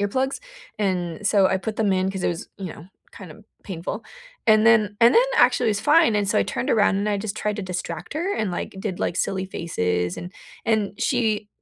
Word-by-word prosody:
earplugs, 260 +7 -1 0.4
and 185 -2 -2
so 195 -1 +4
I 190 - +1
put 215 +3 -5
them 210 -3 +2
in 185 0 +1
'cause 190 -2 -4
it - - +3
was, 170 - -4
you 185 -5 -5
know, 160 - -13 0.3
kinda 200 +3 -12 0.2
painful, 190 +4 -6 0.4
and 215 0 +5
then 215 -3 +4
and 235 +1 +6
then, 470 - +7
actually, 245 - +4
it - - +3
was 205 -1 -1
fine, 300 -7 +4
and 205 -1 0
so - - +2
I - - +4
turned - - -3
around 205 -3 +3
and 205 +1 -1
I 205 -1 0
just 210 +1 -4
tried 210 -1 -2
to 210 - -4
distract 180 - -5
her 355 +6 -1
and, 215 -3 -1
like, 175 - -5
did, 190 -3 -4
like, - - -1
silly 190 +1 -1
faces, 90 - -2
and 175 +2 -8 0.3
and 210 -3 0
she 220 -4 0
205 Hz, 220 wpm, -23 LUFS, 185-220 Hz, 0.4 s, then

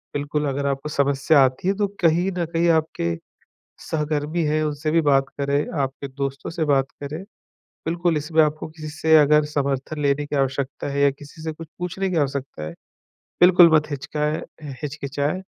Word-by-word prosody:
बिल्कुल 145 +1 -1
अगर 140 +1 -2
आपको 140 +2 -2
समस्या 140 +1 +3
आती 130 +7 -2
हैं, 195 - +2
तो 205 -1 +1
कहीं 175 +3 +3
न 175 - 0
कहीं 170 +1 +2
आपके 155 - +1 0.7
सहकर्मी 155 +1 -1
हैं, 155 +1 +1
उनसे 150 +1 -2
भी 165 +1 +4
बात 135 -2 +4 0.2
करें, 140 +1 +1
आपके 135 +1 -3
दोस्तों 135 0 -4
से 165 -1 -1
बात 135 -2 +2
करें। 150 +5 -5 0.6
बिल्कुल 170 0 +1
इसमें 160 +2 +2
आपको 155 0 -2
किसी 155 -1 -9
से 160 +1 +3
अगर 150 0 +5
समर्थन 145 0 -2
लेने 140 0 +1
की 145 - -4
आवश्यकता 135 0 -1
हैं 140 - -2
या 140 - +6
किसी 145 +3 -13
से 160 - -2
कुछ 165 +1 -10
पूछने 185 +2 -2
की 180 - -1
आवश्यकता 140 - -2
हैं, 80 +1 -6 0.7
बिल्कुल 175 -1 +8
मत 150 0 +2
हिचकाएँ 150 +2 -2 0.4
हिचकिचाएँ 145 +3 -3
150 Hz, 175 wpm, -23 LUFS, 140-160 Hz, 0.7 s, बिल्कुल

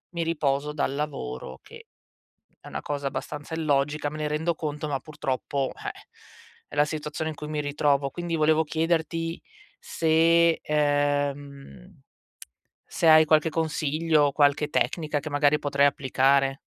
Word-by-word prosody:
mi 170 - -1
riposo 150 -2 -1
dal 140 -2 -1
lavoro, 140 - -5
che - - -14 0.8
è - - -12
una - - -5
cosa 145 -1 -3
abbastanza 145 +3 -5
illogica, 145 -1 0
me 150 - -9
ne 150 - -1
rendo 160 +2 -1
conto, 150 -1 -4
ma 140 - -1
purtroppo, 140 -2 -3
eh, - - -5 0.8
è - - -10
la 145 0 +4
situazione 155 +1 -4
in - - -9
cui 150 - -8
mi 150 -1 -2
ritrovo. 145 -1 +1
Quindi 175 +1 -4
volevo 155 +1 +3
chiederti 165 +1 -1 0.4
se 165 +1 +3
ehm, 145 - -2 0.9
se 165 - 0
hai 155 0 +8
qualche 155 +1 +3
consiglio, 155 -1 +1
qualche 145 +1 +2
tecnica 155 -1 0
che 155 - -7
magari 145 +1 +2
potrei 140 -1 +2
applicare. 135 0 +1
150 Hz, 140 wpm, -26 LUFS, 145-160 Hz, 0.9 s, hai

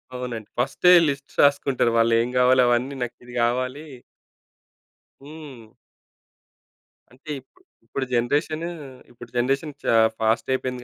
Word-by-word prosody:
అవునండి. 120 -4 -6
ఫస్టే 160 +8 +4
లిస్ట్స్ 140 0 -5
రాసుకుంటరు, 140 -4 +2
వాళ్ళేం 115 +1 +2
గావాలో 125 0 +5
అవన్నీ 125 +3 0
నాకిది 120 0 -9
గావాలి 130 +5 -1 1.4
హ్మ్. 140 -7 -12 1.4
అంటే 130 +5 -17
ఇప్పుడు, 130 - -31 0.2
ఇప్పుడు 130 +3 -4
జనరేషనూ 155 +7 -1 0.4
ఇప్పుడు 120 -1 -13
జనరేషను 135 +4 -1
చా 115 - +3 0.2
ఫాస్టయిపోయింది 125 +3 -1
125 Hz, 100 wpm, -23 LUFS, 120-140 Hz, 1.4 s, గావాలో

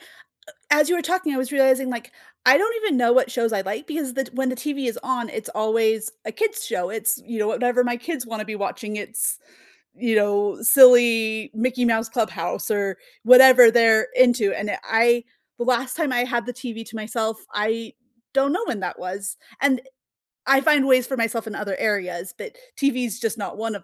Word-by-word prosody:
uh - - -21 0.7
as 300 +2 +4
you 355 - +2
were - - -1
talking, 340 -3 -1
I 260 - -3
was 255 -1 -3
realizing, 265 -2 +2
like, 245 0 -6 0.3
I 255 +2 +7
don't 450 +3 0
even 285 -11 +1
know 235 -1 +2
what 260 +1 +3
shows 230 -3 -1
I 195 - -1
like, 210 +9 -6
because 305 -5 -4
the 270 +1 -2
t - - -15
when 265 0 -1
the 255 - -3
TV 280 +1 -4
is 230 - -3
on, 255 -3 -3
it's 220 - -7
always 220 0 0 0.2
a 215 - -5
kids' 440 0 -2
show. 180 +1 -3
It's, 220 0 -1
you 230 -1 -6
know, 210 - 0
whatever 245 +2 +1
my 240 0 -1
kids 255 -1 -6
wanna 225 -1 -6
be 215 0 -7
watching. 210 +1 -5
It's, 220 +2 -3 0.6
you 235 -2 -2
know, 205 -1 +1
silly 230 -3 +5
Mickey 250 +2 -1
Mouse 225 0 0
Clubhouse, 225 -1 -3
or 200 -3 -1 0.3
whatever 250 -1 +9
they're 225 0 +4
into, 245 -5 +3
and 210 - -4
e - - -2
I 235 +1 +2 0.3
the 240 - -2
last 255 +2 -1
time 305 -6 -1
I 245 0 +1
had 240 -2 -2
the 245 - -5
TV 235 -3 -8
to 225 - -9
myself, 220 0 -3 0.2
I 220 +2 -2 0.4
don't 275 +1 +2
know 400 +6 -2
when 215 - -4
that 185 - -5
was, 190 +4 -6 0.2
and, 265 -2 +2 0.7
I 270 0 +5
find 290 -3 +3
ways 255 -2 +4
for 265 - -3
myself 230 0 -2
in 220 - -7
other 200 -2 -4
areas, 180 -4 -3
but - - -10 0.2
TV's 250 -6 -1
just 225 0 -3
not 205 - -6
1 225 -1 -4
of 200 - -9
235 Hz, 210 wpm, -22 LUFS, 220-260 Hz, 0.7 s, whatever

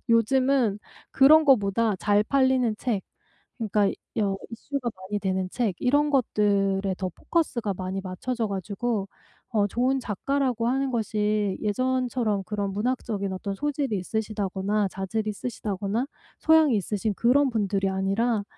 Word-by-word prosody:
요즘은 235 -1 +3 0.3
그런 310 +4 +6
거보다 220 -5 +3
잘 205 +3 +2
팔리는 260 -2 +2
책, 220 -7 -1 0.6
그러니까 210 -3 +1 0.3
여 200 -3 +1
이슈가 245 +2 -4
많이 190 +2 -4
되는 190 -2 -1
책, 225 -7 -1
이런 290 +4 +2
것들에 200 -7 +1
더 185 -1 -2
포커스가 235 - -1
많이 185 +1 -4
맞춰져 220 +5 -3
가지고 200 +2 -2 0.4
어 210 -3 +2
좋은 255 +6 +1
작가라고 245 +2 -1
하는 270 +1 0
것이 210 -3 0
예전처럼 245 -2 0
그런 200 0 -3
문학적인 210 -2 -2
어떤 195 +1 -4
소질이 280 -4 -1
있으시다거나 205 0 -1
자질이 195 +4 -3
있으시다거나 210 +1 -3 0.3
소양이 315 -5 +4
있으신 210 +1 -1
그런 265 +6 +3
분들이 200 -4 0
아니라 200 +4 0
215 Hz, 320 characters per minute, -26 LUFS, 195-250 Hz, 0.6 s, 그런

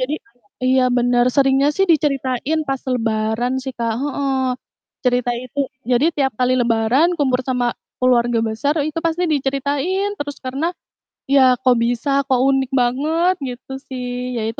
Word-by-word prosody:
jadi 260 +4 -1 0.5
iya 255 0 +3
bener. 245 0 +2
Seringnya 275 +1 +3
sih 390 - +3
diceritain 290 -2 +1
pas 270 -1 -2
Lebaran 225 +1 0
sih 265 - -4
Kak, 230 -1 -1
heeh. 275 -2 -1 0.6
Cerita 245 0 +2
itu 255 +4 -5 0.3
jadi 255 +6 +3
tiap 270 -2 0
kali 255 0 +2
Lebaran 240 +8 +2
kumpul 260 -3 +1
sama 250 -2 0 0.3
keluarga 240 -2 +3
besar 225 +7 -1
itu 310 +1 -3
pasti 335 +2 0
diceritain 285 +8 -1
terus 290 0 -5
karena, 275 +7 -2 0.6
"Ya 260 -2 +5
kok 250 -2 +3
bisa? 245 +4 +1
Kok 260 -2 +2
unik 270 -1 0
banget?" 300 +9 +1
Gitu 255 +1 -7 0.2
sih, 250 -1 -4
ya 220 - -2
itu 225 - -7
260 Hz, 150 wpm, -19 LUFS, 245-285 Hz, 0.6 s, Ya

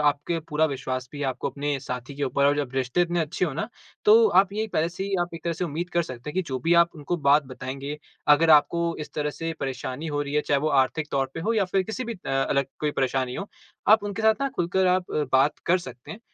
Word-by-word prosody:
आपके 145 +3 +1
पूरा 155 +1 +2
विश्वास 130 -2 -4
भी 145 0 -5
आपको 130 -2 -2
अपने 145 -1 -2
साथी 125 +1 -6
के 145 - -4
ऊपर 140 +1 +1
और 145 +1 +3
जब 140 -4 -2
रिश्ते 130 +4 0
इतने 175 0 0
अच्छे 160 +3 -1
हो 155 - -2
ना 190 +8 -3 0.4
तो 445 +2 +7
आप 195 +1 +4
ये 215 +1 -1
पहले 160 +2 +1
से 180 +3 -5
ही 200 0 -2
आप 175 -1 -2
एक 165 - -8
तरह 170 - 0
से 170 +2 -3
उम्मीद 170 +3 -4
कर 170 - +2
सकते 130 -1 -7
हैं - - -12
कि 185 - +1
जो 130 -1 -2
भी 165 +4 +2
आप 170 0 +5
उनको 155 +3 -3
बात 145 -1 +4
बताएँगे, 135 +3 -6 0.3
अगर 150 +2 +5
आपको 170 +2 +4
इस 150 - -7
तरह 150 -1 -1
से 165 +2 -4
परेशानी 130 +3 -4
हो 145 -1 -1
रही 145 0 -5
है, 150 - +4
चाहे 140 -2 +1
वो 155 - +1
आर्थिक 145 +3 -1
तौर 135 -1 0
पे 165 - -4
हो 225 +7 0
या 205 -3 +3
फिर 190 +1 +1
किसी 220 +6 -4
भी 235 - -4
अ, 185 - -10
अलग 135 0 +1
कोई 150 -1 +1
परेशानी 130 -2 -1
हो, 195 - -4 0.4
आप 215 0 +7
उनके 205 +2 -4
साथ 220 0 +5
ना 275 - +1
खुलकर 185 +2 +1
आप 180 0 +1 0.2
बात 135 +3 +3
कर 180 +2 +4
सकते 125 -6 -10
हैं। 215 - -8
150 Hz, 260 wpm, -25 LUFS, 140-175 Hz, 0.4 s, तो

